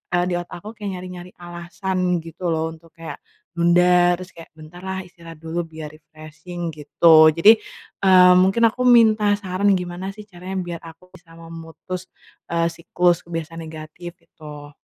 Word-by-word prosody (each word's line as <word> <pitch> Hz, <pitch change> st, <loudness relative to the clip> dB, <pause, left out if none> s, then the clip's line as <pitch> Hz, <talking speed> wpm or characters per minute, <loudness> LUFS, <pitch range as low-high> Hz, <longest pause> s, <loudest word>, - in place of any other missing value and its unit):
eee, 175 Hz, -, +2 dB
di 175 Hz, -, -1 dB
otak 175 Hz, 0 st, -9 dB
aku 215 Hz, -, -7 dB
kayak 205 Hz, -2 st, -5 dB
nyari-nyari 180 Hz, 0 st, -10 dB
alasan 175 Hz, +1 st, -3 dB
gitu 165 Hz, +2 st, -6 dB
loh 160 Hz, 0 st, -1 dB
untuk 165 Hz, 0 st, -16 dB
kayak 165 Hz, -1 st, -8 dB, 0.3 s
nunda, 175 Hz, +1 st, +4 dB
terus 185 Hz, +1 st, -11 dB
kayak, 165 Hz, -1 st, -13 dB
"Bentar 155 Hz, +3 st, -13 dB
lah 190 Hz, 0 st, -5 dB
istirahat 170 Hz, -2 st, -13 dB
dulu 165 Hz, +1 st, -3 dB
biar 155 Hz, -2 st, -9 dB
refreshing 155 Hz, +2 st, -9 dB
gitu." 155 Hz, +1 st, +5 dB
Jadi, 215 Hz, +6 st, +6 dB, 0.4 s
eee, 185 Hz, -1 st, +6 dB
mungkin 195 Hz, +5 st, +2 dB
aku 250 Hz, +1 st, -1 dB
minta 220 Hz, -4 st, +5 dB
saran 195 Hz, 0 st, 0 dB
gimana 180 Hz, +2 st, -5 dB
sih 210 Hz, -, -10 dB
caranya 190 Hz, -1 st, -9 dB
biar 170 Hz, -1 st, -6 dB
aku 165 Hz, +2 st, -15 dB
bisa 170 Hz, -2 st, -18 dB
memutus, 165 Hz, +2 st, -9 dB, 0.4 s
eee, 170 Hz, 0 st, 0 dB
siklus 175 Hz, +1 st, 0 dB
kebiasaan 165 Hz, 0 st, -6 dB
negatif, 160 Hz, +2 st, -9 dB
gitu? 150 Hz, -3 st, -13 dB
175 Hz, 160 wpm, -21 LUFS, 165-185 Hz, 0.4 s, Jadi